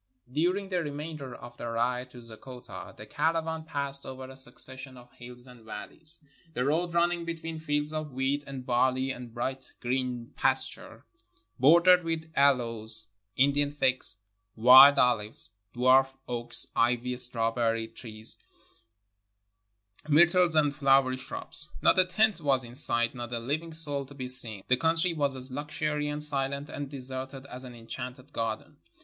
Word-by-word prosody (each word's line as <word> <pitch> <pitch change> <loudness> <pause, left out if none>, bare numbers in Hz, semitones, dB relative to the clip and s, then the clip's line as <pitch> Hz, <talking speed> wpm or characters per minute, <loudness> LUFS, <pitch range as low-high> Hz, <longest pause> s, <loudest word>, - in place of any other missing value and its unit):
During 180 +7 0
the 180 -2 0
remainder 145 -3 -6
of 120 0 -12
the 120 - -6
ride 125 +2 -1
to 125 -1 -13
Zeggota 125 +2 -9
the - - -10
cara 165 +1 0
van 160 0 -5
passed 140 -3 -2
over 130 0 -8
a - - -12
succession 130 0 -5
of 125 0 -16
hills 125 -1 -12
and 125 -3 -15
valleys, 155 +8 -4 0.4
the 125 - -1
road 170 +4 0
running 170 0 +1
between 165 -1 -6
fields 150 -1 -1
of 155 -1 -4
wheat 135 +3 -1
and 135 -2 -7
barley 130 +2 +1
and 125 -2 -8
bright 130 +3 -5
green 125 -1 -3
pasture, - - 0 0.5
bordered 170 +6 +6
with 160 -1 -4
aloes, 115 -6 +2 0.3
Indian 140 +2 +3
figs, 130 -6 -1 0.4
wild 130 +5 +9
olives, 115 -3 +2 0.2
dwarf 130 +2 +5 0.2
oaks, 120 -1 0
ivy, 125 +1 +1
strawberry 115 -2 +1
trees, 110 -1 -2 1.7
myrtles, 175 +2 +5
and 145 -2 +3
flowering 135 -2 +3
shrubs. - - -2
Not - - +4
a 185 - +5
tent 200 +1 +1
was 135 -3 +2
in 120 0 -11
sight, 120 -3 +5
not 120 -2 -7
a 120 - -1
living 150 +8 -3
soul 145 -4 0
to 140 - -14
be 130 -2 -5
seen. 115 -6 +1
The 130 - +3
country 165 +4 +2
was 140 -4 0
as 130 0 -3
luxuriant, 150 +1 -3
silent, 140 -1 -2
and 145 -1 -6
deserted 130 0 -6
as 130 -1 -7
an 125 -2 -10
enchanted 125 +4 -7
garden. 110 -1 -4
130 Hz, 150 wpm, -28 LUFS, 125-150 Hz, 1.7 s, wild